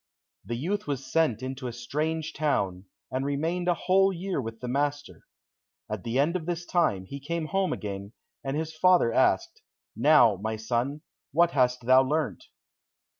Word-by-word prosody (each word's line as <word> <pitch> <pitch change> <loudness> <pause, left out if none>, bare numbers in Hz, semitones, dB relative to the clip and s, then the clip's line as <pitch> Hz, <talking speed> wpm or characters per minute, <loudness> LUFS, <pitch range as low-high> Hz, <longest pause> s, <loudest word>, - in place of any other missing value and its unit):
The 120 - -4
youth 195 - -2
was 135 -2 -3
sent 130 -5 +1
into 130 0 -4
a - - -3
strange 155 +7 -3
town, 100 -12 -1 0.3
and 130 +1 -1
remained 160 +6 -1
a 175 - +3
whole 195 +2 +3
year 185 -3 -3
with 115 -1 -7
the 125 - -6
master. 140 - -2 0.6
At 105 -3 -4
the 115 +2 -2
end 150 +6 +2
of 170 -3 -3
this 175 0 -3
time, 155 - +1
he 140 +8 -7
came 165 +3 -3
home 190 +3 0
again, 100 0 -5 0.3
and 135 +1 -2
his 160 0 -3
father 175 -8 +4
asked, 345 - +2 0.3
"Now, 125 -9 +5
my 110 +3 -3
son, 120 +6 -2 0.3
what 170 +2 +4
hast 125 -3 +1
thou 130 +1 +7
learnt?" 150 +3 -1
140 Hz, 170 wpm, -27 LUFS, 120-165 Hz, 0.6 s, thou